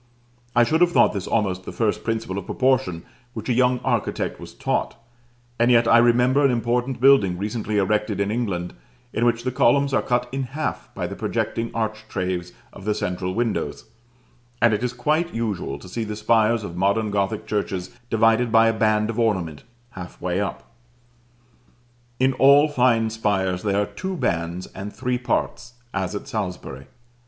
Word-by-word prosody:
I 120 - +6
should 160 +8 +1
have 175 0 +5
thought - - +4
this 100 -3 -4
almost 95 -4 0
the - - -7
first 110 -3 -1
principle 115 -4 -2
of 95 - -10
proportion 130 -10 +1 0.3
which 110 +2 -5
a - - +3
young 125 +1 +3
architect - - -1
was - - -11
taught: - - -1 0.6
and 120 +1 +4
yet 120 -1 +5
I 115 0 +6
remember 125 +4 +4
an 140 - +5
important 120 +2 0
building, 125 -9 +5
recently 105 +2 -2
erected 105 +1 0
in 100 +1 0
England, 100 -7 -2 0.4
in 115 - +1
which 120 0 +1
the 130 - -1
columns 140 +3 +3
are - - +3
cut 125 0 0
in 135 +1 -2 0.2
half - - -3
by - - -3
the - - -5
projecting 115 0 -2
architraves 105 -5 -3 0.2
of 100 - -11
the 105 -1 +1
central 90 0 -3
windows; 115 -1 -2 0.7
and 120 -1 +4
it 105 +3 -1
is 125 - 0
quite 155 +5 0
usual 105 -11 -2
to 70 - -13
see 115 +5 -3
the 105 -1 -5
spires 110 +1 +2
of 85 -4 -7
modern 100 +4 +1
Gothic 100 +2 -1
churches 100 -4 -3 0.2
divided 115 +1 +3
by 115 0 +5
a - - +1
band 110 0 +1
of 115 - -5
ornament 90 -10 -1 0.3
half 90 -1 -9
way 90 +2 -1
up. 100 - -4 1.6
In 130 +1 +3
all 140 +3 +6
fine 120 -6 +2
spires 95 -5 0
there 100 0 0
are 105 - +1
two 190 - -5
bands 85 - -2
and 100 +1 -6
three 125 +3 -2
parts, 120 0 -2 0.2
as 95 0 -2
at 100 - -6
Salisbury. 90 - -5
110 Hz, 175 wpm, -23 LUFS, 100-120 Hz, 1.6 s, I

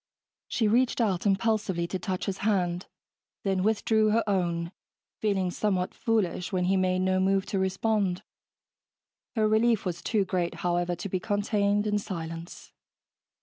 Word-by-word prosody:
She 225 - +1
reached 240 +4 +2
out 205 -4 +1
impulsively 200 -3 +1
to 185 - -3
touch 185 -1 -3
his 195 -1 -3
hand, 180 -4 0 0.6
then 190 -2 +1
withdrew 220 +1 +2
her 225 +2 +3
own, 170 -4 0 0.5
feeling 195 -4 0
somewhat 185 -2 -1
foolish 210 -6 -1
when 185 -2 0
he 190 +2 +2
made 185 0 +1
no 185 0 +2
move 195 +1 +2
to 195 - -2
respond. 190 -1 0 1.1
Her 215 -2 +3
relief 220 0 +3
was 175 -2 -3
too 210 -4 +1
great, 175 -2 -1
however, 175 0 +1
to 175 +3 -5
be 185 -1 -1
contained 205 +1 +1
in 210 -1 +1
silence. 165 -4 -7
195 Hz, 145 wpm, -28 LUFS, 180-210 Hz, 1.1 s, her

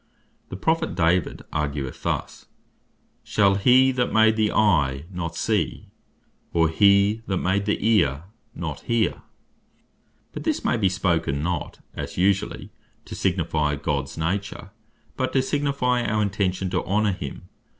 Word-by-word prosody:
The - - -6
Prophet 160 - 0
David 85 0 +1
argueth 70 -3 -3
thus, - - -4 0.8
"Shall 100 -2 +3
he 125 +6 +5
that 125 -1 -1
made 110 0 +4
the 110 -1 +1
eye, 75 -9 +2
not 85 -3 -4
see? - - -1 0.6
or 80 -1 +2
he 100 +5 +4
that 95 - 0
made 95 +3 0
the 105 - +1
ear, 75 -10 +2 0.3
not 80 -4 -5
hear?" 115 -2 0 1.1
But - - -7
this - - -1
may - - +2
be 105 -5 +2
spoken, 85 -6 0
not 85 -2 -3
(as - - -6
usually) 95 +2 0 0.3
to - - -9
signifie 80 -5 0
Gods 70 -1 -3
nature, 95 +4 -3 0.5
but 130 -1 -1
to 135 - +3
signifie 140 -3 0
our 105 -1 0
intention 95 -2 -1
to 90 - 0
honor 105 +3 +1
him. 70 -6 -7
95 Hz, 140 wpm, -24 LUFS, 80-110 Hz, 1.1 s, he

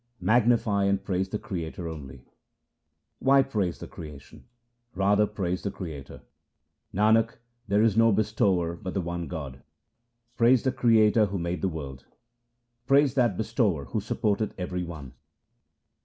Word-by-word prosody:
Magnify 110 -3 +2
and 100 0 +1
praise 95 0 -1
the 105 - -2
Creator 85 -4 -5
only: 70 -5 -9 0.5
— - - -53
Why 135 0 +5
praise 105 -10 -2
the - - -9
creation? 75 -4 -11 0.5
Rather 100 +2 +3
praise 90 -4 -3
the 100 - -2
Creator; 75 -9 -8 0.7
Nanak, 110 +3 +3 0.3
there 105 +2 +3
is 110 -3 +3
no 115 0 +5
bestower 100 -5 +1
but 95 +2 -7
the 95 - +1
One 85 0 -4
God. 70 -7 -7 0.8
Praise 120 +1 +4
the 130 - +1
Creator 110 -4 +4
who 100 0 -4
made 85 0 -3
the 95 - +1
world; 70 -6 -8 0.8
Praise 140 -1 +4
that 120 -8 +2
Bestower 110 - 0
who - - +1
supporteth 105 -1 -1
every 90 -1 -3
one. 75 -6 -8
100 Hz, 140 wpm, -27 LUFS, 85-110 Hz, 0.8 s, Why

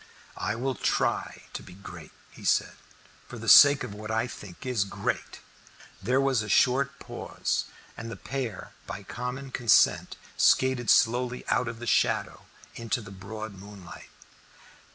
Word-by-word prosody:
"I 105 - -1
will 130 +3 -2
try - - -1
to - - -5
be 90 - -13
great," 85 -5 -11 0.2
he - - -14
said, - - +2 0.5
"for - - -9
the - - -8
sake 145 -1 +8
of 115 -5 -6
what 105 +1 -8
I 110 +1 0
think 105 -6 -10
is 125 -6 +1
great." 100 - -4 0.6
There 125 +7 +1
was 135 -4 +2
a 105 - -6
short 135 +6 +3
pause, - - -3 0.3
and 115 0 -7
the 115 - -6
pair 125 - -5 0.2
by 100 - -6
common 125 +5 -6
consent 120 -4 +3 0.2
skated 130 -2 +3
slowly 125 +2 +2
out 125 - +1
of 115 -1 -5
the 120 - -8
shadow 110 - 0 0.3
into 115 +1 -2
the 105 -4 -10
broad 105 +3 -7
moonlight. 100 -2 -12
115 Hz, 155 wpm, -27 LUFS, 105-125 Hz, 0.6 s, sake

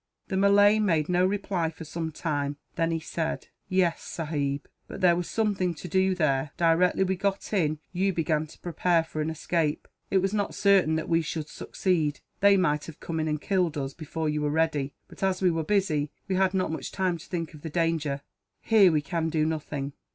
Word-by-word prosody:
The 190 - -1
Malay 205 +2 +5
made 165 -7 +1
no 180 0 +3
reply, 190 -4 -1
for 160 - -10
some 160 +1 -4
time. 145 -2 -2 0.2
Then 165 -3 0
he 165 -1 0
said: 160 0 -3 0.2
"Yes, 185 -3 +2
sahib, 145 -3 -3 0.2
but - - -8
there 175 -2 +5
was 175 0 -3
something 195 -6 0
to 180 - -8
do, 190 +2 +2
there. 145 -4 +1
Directly 175 +3 +3
we 190 0 0
got 200 +2 -2
in, 155 -6 +1 0.2
you 190 +2 +1
began 160 -3 0
to - - -15
prepare 170 0 +1
for 155 -1 -5
an 155 - -1
escape. 160 -1 -1 0.2
It 195 - +3
was 190 +1 +1
not 205 -1 -1
certain 200 -6 +4
that 160 - -2
we 165 0 +3
should 155 -1 -4
succeed. 160 -6 -1 0.2
They 200 0 +6
might 150 -5 +1
have 165 - -10
come 160 -1 -4
in 155 - 0
and 150 -1 -1
killed 180 -3 0
us, 135 -1 -3
before 160 0 -4
you 150 0 0
were 150 - +1
ready 150 -3 0
but, - - -15
as 190 -1 +1
we 185 -2 +3
were 165 -1 -1
busy, 155 -6 +1 0.2
we 190 - -1
had 190 0 +2
not 185 -4 0
much 160 - -5
time 185 -3 0
to - - -12
think 165 -3 -4
of 150 - -12
the 160 - -5
danger. 155 -4 0 0.4
"Here 205 -5 +6
we 150 -2 +1
can 160 +3 -1
do 155 -1 +1
nothing." 150 -3 -3
165 Hz, 210 wpm, -27 LUFS, 155-185 Hz, 0.4 s, They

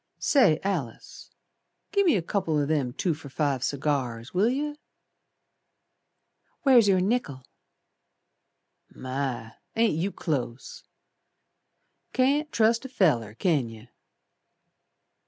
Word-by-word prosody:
"Say, 205 - +4
Alice, 165 - -4 0.6
gi' 400 -1 +3
me 345 -6 +4
a 180 - 0
couple 170 -4 -1
O' 145 - +1
them 145 -4 0
two 170 +7 -1
for 150 -2 -10
five 135 -2 -1
cigars, 130 -5 -2
Will 200 +5 +3
yer?" 295 +4 -2 1.9
"Where's 250 -7 +6
your 190 -2 +4
nickel?" 180 - -1 1.4
"My! 130 -3 -4 0.2
Ain't 225 -3 +3
you 175 +6 -1
close! 135 -9 -4 1.3
Can't 285 +4 +2
trust 230 +2 +2
a 265 - -7
feller, 125 - +1
can 145 -4 +1
yer." 115 +1 -13
160 Hz, 105 wpm, -26 LUFS, -, 1.9 s, Where's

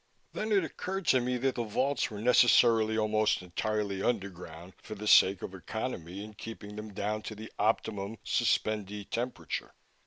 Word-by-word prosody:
Then 215 +1 -3
it 200 -3 +4
occurred 190 +3 -4
to 130 - +5
me 125 +1 -1
that 130 +1 0
the 120 - -2
vaults 130 +5 0
were 105 - -7
necessarily 115 -1 +5
almost 110 -2 +2
entirely 100 +2 -2
underground, 95 -5 -3
for 110 - -8
the 105 +1 -7
sake 95 -2 +6
of 95 - -5
economy 95 -2 -5
in 110 0 -10
keeping 105 -1 -9
them 105 0 -7
down 105 +2 -2
to 110 - -7
the 110 +1 -9
optimum 105 -1 0
suspendee 105 -2 0
temperature. 125 +2 -4
110 Hz, 160 wpm, -30 LUFS, 100-120 Hz, -, sake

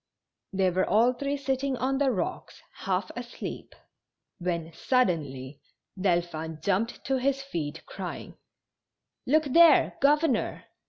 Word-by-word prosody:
They 190 -2 +2
were 185 +2 0
all 230 +5 +4
three 280 +3 -2
sitting 270 -1 -1
on 270 +2 0
the 280 -2 +3
rocks 210 -8 -3
half 185 0 -2
asleep, 240 0 -7 0.6
when 170 -2 -3
suddenly 150 - -1 0.3
Delphin 170 -4 -1
jumped 200 +7 -1
to 270 - +1
his 270 +1 0
feet, 160 - -5
crying: - - -7 0.5
" - - -44
Look 310 +4 +4
there, 320 +3 +5
governor 290 -3 +2
230 Hz, 120 wpm, -27 LUFS, 175-270 Hz, 0.6 s, there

